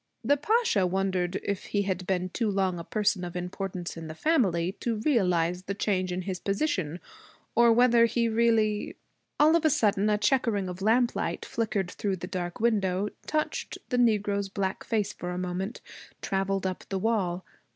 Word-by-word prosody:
The 285 - +4
Pasha 295 - +2
wondered 185 -1 -1
if 200 -1 -3
he 205 -1 0
had 185 -2 -3
been 185 -1 0
too 220 +5 -1
long 190 -3 0
a - - -5
person 205 -1 0
of 175 0 -6
importance 180 0 -4
in 165 -1 -7
the 155 - -7
family 185 - +2
to 235 -2 -1
realize 180 - +1
the 195 - -3
change 185 -3 0
in 180 +1 -3
his 185 -1 -4
position, 195 - -1 0.5
or 235 0 +5
whether 235 0 +5
he 235 0 +1
really 220 -2 +1 0.4
All 310 +2 +6
of 335 - +2
a 315 - +5
sudden 210 -5 +2
a 210 - +3
checkering 210 -2 +1
of 180 +1 -7
lamplight 235 +4 +1
flickered 205 -5 -2
through 200 -2 -2
the 180 - -6
dark 180 -2 -4
window, 205 -3 +1 0.2
touched 305 0 -2
the 250 - 0
negro's 205 -4 +2
black 190 -1 -2
face 210 -3 -1
for 175 - -6
a 180 - -3
moment, 185 +4 -3 0.4
traveled 195 0 -1
up 185 -1 -3
the 195 - -1
wall. 190 -4 0
195 Hz, 175 wpm, -28 LUFS, 185-225 Hz, 0.5 s, All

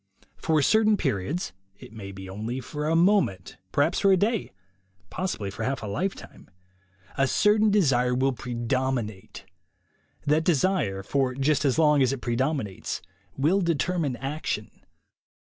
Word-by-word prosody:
For 160 -1 +1
certain 215 +4 +4
periods 135 - -2
— 95 +1 -40
it - - -13
may 100 -3 -8
be 95 -1 -9
only 110 +7 -4
for 150 +4 -4
a 160 - +2
moment, 170 - +2
perhaps 150 - +2
for 195 - +4
a 190 - +5
day, 215 +2 0 0.6
possibly 110 - -3
for 105 - -8
half 130 +2 -2
a - - -3
lifetime 180 - -5 0.3
— 95 +3 -28
a 135 - +4
certain 210 +7 +3
desire 130 -11 +3
will 135 +1 +1
predominate. 120 -3 -3 0.8
That 150 +2 +2
desire, 155 - +1
for 130 +3 0
just 140 +2 +1
as 135 0 +2
long 150 -3 +4
as 130 -1 +3
it 135 - -3
predominates, 120 - -2 0.3
will 165 +9 +2
determine 165 -3 0
action. 140 +5 -4
135 Hz, 145 wpm, -26 LUFS, 115-170 Hz, 0.8 s, a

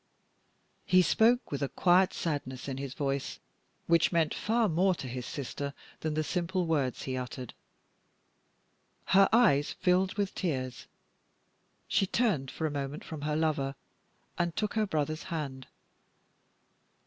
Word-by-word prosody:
He 185 0 +5
spoke 235 +6 +3
with 140 - -3
a 140 - 0
quiet 180 +1 +4
sadness 140 -6 -3
in 135 -1 -3
his 135 -1 -5
voice, 140 -1 -2 0.5
which 170 -1 +4
meant 165 -3 +2
far 225 +1 +1
more 185 +2 +2
to 135 - -6
his 125 0 -5
sister 140 0 -5 0.2
than 155 -1 -2
the 155 - +1
simple 180 +3 -1
words 145 -6 0
he 130 - -3
uttered. 125 -1 -5 1.6
Her 195 +1 +7
eyes 210 - +4
filled 185 +1 +2
with 200 -2 -1
tears; 130 -8 -3 1.0
she 195 - +2
turned 185 - +1
for 160 - -4
a 155 - 0
moment 140 +1 -4
from 155 -3 -7
her 150 +1 -1
lover, 150 -3 0 0.6
and 170 -1 0
took 210 -1 -1
her 215 -2 +1
brother's 155 -2 -1
hand. 140 -6 -4
155 Hz, 140 wpm, -30 LUFS, 140-185 Hz, 1.6 s, Her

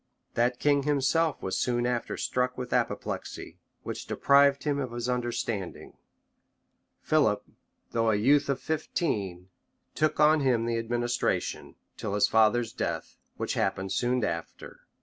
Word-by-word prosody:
That 120 +1 +1
king 145 +1 +3
himself 150 +3 +1
was 95 - -1
soon 120 -1 0
after 120 -1 -2
struck 125 0 -1
with 125 -1 -4
an - - +5
apoplexy, - - -5 0.2
which - - -6
deprived 140 0 +4
him 145 -1 0
of 130 -4 -4
his 120 0 -3
understanding: 120 -5 -3 1.1
Philip 110 -10 +2 0.5
though 115 -1 +1
a 110 - +3
youth 140 +8 +3
of 140 - 0
fifteen, 100 - -2 0.4
took 155 -1 0
on 155 +1 +6
him 125 -5 +2
the 115 -1 0
administration, 120 +1 -1 0.2
till 100 - -3
his 105 - +4
father's 110 +1 +3
death, - - -4 0.2
which - - -2
happened 95 0 -1
soon 125 +2 +1
after, 85 -3 -5
{1180. - - -49
120 Hz, 145 wpm, -28 LUFS, 115-140 Hz, 1.1 s, on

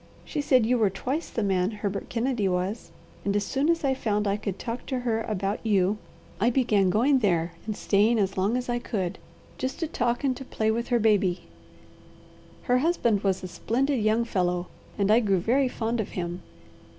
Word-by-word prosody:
She 300 - -2
said 255 -5 +4
you 245 +1 +2
were 215 -3 +4
twice 260 - -3
the 225 - -2
man 190 -2 +1
Herbert 205 -2 -4
Kennedy 235 -3 0
was, 185 +4 -2 0.3
and 200 0 0
as 205 - +2
soon 275 - 0
as 335 -1 +2
I 270 -1 +2
found 210 -5 -1
I 200 - +2
could 200 -2 -4
talk 235 +3 -5
to 260 -2 -2
her 225 -2 0
about 200 -2 -2
you, 205 -1 +2 0.4
I 225 +4 +3
began 220 -7 +2
going 260 +8 +3
there 175 -6 +1 0.2
and 215 - -3
staying 215 +4 +3
as 195 -2 0
long 200 +6 +1
as 250 - -4
I 240 0 0
could, 190 -6 -3 0.4
just 260 - -2
to - - +1
talk 240 -2 -1
and 265 -2 +1
to - - -7
play 220 -4 0
with 235 +2 -2
her 240 - +2
baby. 205 -5 +2 1.2
"Her 250 0 +2
husband 245 - +2
was 190 -1 0
a - - -3
splendid 260 +9 0
young 220 +2 +2
fellow, 180 -4 0 0.3
and 200 0 +2
I 225 - +6
grew 200 -5 +2
very 250 +9 +2
fond 235 -1 -2
of 220 - -2
him. 175 0 -3
220 Hz, 200 wpm, -26 LUFS, 195-245 Hz, 1.2 s, I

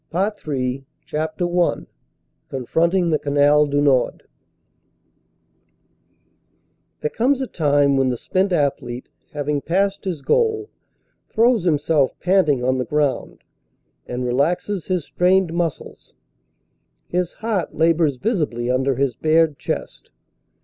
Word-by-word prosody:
CAMBRAI 195 +5 0 0.2
CAMBRAI 130 -1 -2 0.2
CHAPTER 155 +3 -2 0.2
I - - -2 0.6
CONFRONTING 170 +7 +1
THE 155 - +2
CANAL 145 +1 +3
DU 145 0 +1
NORD 135 -3 +2 2.8
THERE 150 - -1
comes 260 +4 +1
a 265 - -1
time 145 - +2
when 135 -1 +2
the 125 - -2
spent 190 +9 0
athlete, 135 -6 -1 0.2
having 145 -1 -2
passed 195 +5 0
his 170 -7 -4
goal, 440 - +1 0.6
throws 230 -3 +2
himself 150 -3 +1
panting 175 -9 +2
on 130 +1 +1
the - - 0
ground 145 0 -1 0.6
and 125 +1 -3
relaxes 165 +9 -1
his 180 -5 -1
strained 180 -1 +2
muscles; 170 -3 -4 0.9
his 180 -1 -2
heart 215 -6 -3
labors 160 -3 +2
visibly 130 - -1
under 130 +1 +1
his 135 -1 0
bared 155 +1 +2
chest. - - -5
155 Hz, 115 wpm, -21 LUFS, 140-180 Hz, 2.8 s, CANAL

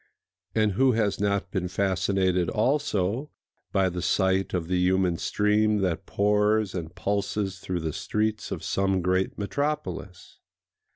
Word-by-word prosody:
And 110 -1 +3
who 130 +6 +3
has 110 -3 0
not 100 -1 0
been 95 -3 -1
fascinated 95 -1 +1
also 120 0 0 0.4
by 95 -1 +2
the 90 -1 -3
sight 95 +1 +1
of 85 -3 -2
the 90 0 +1
human 90 -1 +2
stream 105 +1 +2
that 90 -4 -1
pours 105 0 +2
and 85 -1 -5
pulses 100 -1 -2
through 90 -2 -3
the 80 -1 -3
streets 110 0 -1
of - - -5
some 95 -2 0
great 95 +1 0
metropolis? 140 -5 -4
95 Hz, 135 wpm, -26 LUFS, 90-105 Hz, 0.4 s, And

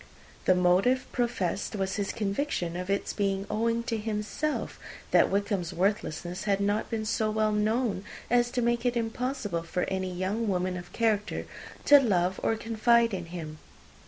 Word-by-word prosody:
The 185 - +5
motive 185 +9 +3
professed 230 -5 -1
was 195 0 -1
his 205 -1 -1
conviction 200 - -2
of 180 +1 -4
its 200 0 0
being 195 -1 0
owing 230 +1 +1
to 230 -1 -2
himself 215 +8 -2 0.3
that - - +5
Wickham's 200 -3 -1
worthlessness 180 -1 -1
had 200 -1 +2
not 205 +1 0
been 220 -1 -2
so 215 0 +1
well 215 0 +1
known 215 -1 0 0.2
as 240 0 +3
to 245 - +1
make 235 0 +1
it 245 -1 +1
impossible 225 -5 -2
for 170 +2 -2
any 190 -1 -2
young 190 +6 -1
woman 185 -1 0
of 175 0 -8
character 215 -3 0 0.4
to 290 0 +9
love 185 -7 +1
or 225 - +1
confide 230 +1 +3
in 180 -3 -4
him. 160 -3 -7
210 Hz, 160 wpm, -28 LUFS, 185-230 Hz, 0.4 s, to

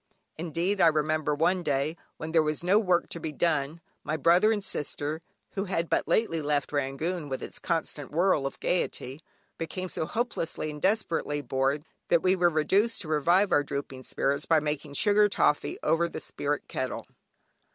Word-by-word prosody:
Indeed, 170 +5 -1
I - - +7
remember 155 -1 +1
one 175 +4 +2
day, 145 0 0 0.2
when 160 0 -5
there 165 -1 +5
was 155 +1 -2
no 190 +4 +4
work 180 -5 +2
to 170 - -5
be 160 - -4
done, 155 0 0 0.2
my 155 +1 -2
brother 175 +8 +5
and 210 -2 -1
sister, 150 -1 -2 0.3
(who 195 0 -2
had 170 -3 -2
but - - +1
lately 165 -8 +1
left 145 -1 0
Rangoon 145 +4 -2
with 130 - -4
its - - -6
constant 160 -4 -2
whirl 165 -3 +2
of - - -8
gaiety) 145 -5 -2 0.4
became 185 +3 -4
so 160 - -3
hopelessly 170 -9 -2
and 150 -1 -9
desperately 170 -8 0
bored, 135 +4 0 0.2
that 170 - +3
we 185 +1 +4
were 175 -1 +4
reduced 195 +8 +2
to - - -9
revive 175 +6 +3
our 145 - +5
drooping 140 -2 -5
spirits 140 +2 -1
by 165 -1 +5
making 150 -1 -3
sugar 210 +2 +4
toffee 150 -6 +1
over 165 +2 +2
the - - -6
spirit 145 0 -3
kettle. 130 0 -4
160 Hz, 175 wpm, -28 LUFS, 145-180 Hz, 0.4 s, I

